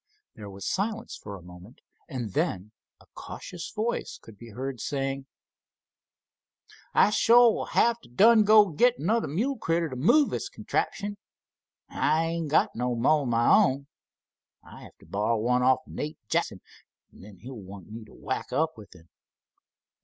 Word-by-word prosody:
There 105 Hz, -2 st, -10 dB
was 95 Hz, 0 st, -9 dB
silence 225 Hz, +4 st, -2 dB
for 100 Hz, -1 st, -9 dB
a 90 Hz, -, -15 dB
moment, 90 Hz, +6 st, -14 dB, 0.3 s
and 120 Hz, -, -5 dB
then 95 Hz, +3 st, -2 dB, 0.3 s
a -, -, -20 dB
cautious 180 Hz, -2 st, -8 dB
voice 225 Hz, +2 st, -3 dB
could 110 Hz, -, -15 dB
be 115 Hz, +3 st, -13 dB
heard 130 Hz, +3 st, -5 dB
saying: 135 Hz, -1 st, -3 dB, 1.6 s
"I 210 Hz, -, +4 dB
suah 235 Hz, +2 st, +6 dB
will -, -, -3 dB
have 235 Hz, 0 st, +2 dB
t' -, -, -18 dB
done 215 Hz, -, +5 dB
go 210 Hz, 0 st, +7 dB
an' 165 Hz, -7 st, -9 dB
git 245 Hz, +3 st, +4 dB
another 220 Hz, +8 st, 0 dB
mule 225 Hz, -, -2 dB
critter 165 Hz, -2 st, 0 dB
t' 130 Hz, -, -7 dB
move 240 Hz, -, +3 dB
this -, -, -3 dB
contraption. 205 Hz, 0 st, -3 dB, 0.7 s
An' -, -, -13 dB
I 160 Hz, +1 st, +2 dB
ain't 165 Hz, -1 st, -3 dB
got 150 Hz, -, +2 dB
no 125 Hz, +1 st, -1 dB
mo' 145 Hz, +6 st, +3 dB
of 135 Hz, -, -4 dB
my 120 Hz, 0 st, +1 dB
own. 135 Hz, +2 st, +2 dB, 0.8 s
I'll -, -, -13 dB
have -, -, -16 dB
to -, -, -17 dB
borrow 105 Hz, +3 st, 0 dB
one 125 Hz, +3 st, +1 dB
off 130 Hz, +3 st, +3 dB
Nate 150 Hz, +1 st, -6 dB
Jackson, -, -, -1 dB, 0.5 s
an' -, -, -16 dB
then 100 Hz, 0 st, -13 dB
he'll 130 Hz, +8 st, -10 dB
want 100 Hz, -3 st, -11 dB
me 115 Hz, +1 st, -8 dB
t' 110 Hz, -, -18 dB
whack -, -, -5 dB
up 160 Hz, -5 st, -1 dB
with 105 Hz, -, -14 dB
him. 80 Hz, +1 st, -18 dB
135 Hz, 175 wpm, -27 LUFS, -, 1.6 s, go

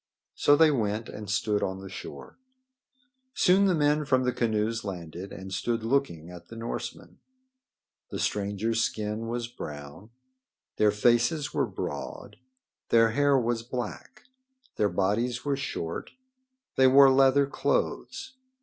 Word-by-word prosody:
So 145 Hz, -, +4 dB
they 155 Hz, +1 st, +5 dB
went 110 Hz, -4 st, -1 dB
and 105 Hz, -1 st, -8 dB
stood 105 Hz, 0 st, 0 dB
on 95 Hz, 0 st, -2 dB
the 95 Hz, -, -9 dB
shore. 80 Hz, -, -9 dB, 1.0 s
Soon 190 Hz, +2 st, +4 dB
the 185 Hz, -3 st, +3 dB
men 150 Hz, 0 st, +2 dB
from 130 Hz, -3 st, +2 dB
the 125 Hz, -, +1 dB
canoes 115 Hz, -1 st, -1 dB
landed 90 Hz, -1 st, -7 dB
and 95 Hz, 0 st, -8 dB
stood 115 Hz, +4 st, -1 dB
looking 115 Hz, -, -1 dB
at 85 Hz, -1 st, -12 dB
the 115 Hz, -, -11 dB
Norsemen. 115 Hz, +1 st, -6 dB, 0.9 s
The -, -, -5 dB
strangers' 105 Hz, +3 st, -1 dB
skin 110 Hz, +1 st, -3 dB
was 120 Hz, 0 st, -3 dB
brown. 75 Hz, -2 st, -9 dB, 0.7 s
Their 105 Hz, -, +4 dB
faces 120 Hz, +7 st, +2 dB
were -, -, +1 dB
broad. 105 Hz, -, -6 dB, 0.5 s
Their 115 Hz, -1 st, +5 dB
hair 145 Hz, +2 st, +3 dB
was 120 Hz, -2 st, 0 dB
black. 120 Hz, -1 st, -6 dB, 0.5 s
Their 105 Hz, -, +2 dB
bodies 115 Hz, +7 st, -1 dB
were 140 Hz, -1 st, +1 dB
short. 85 Hz, -12 st, -4 dB, 0.7 s
They 130 Hz, -, +6 dB
wore 135 Hz, +1 st, +7 dB
leather 135 Hz, +1 st, +5 dB
clothes. 485 Hz, -, -2 dB
115 Hz, 135 wpm, -27 LUFS, 100-135 Hz, 1.0 s, wore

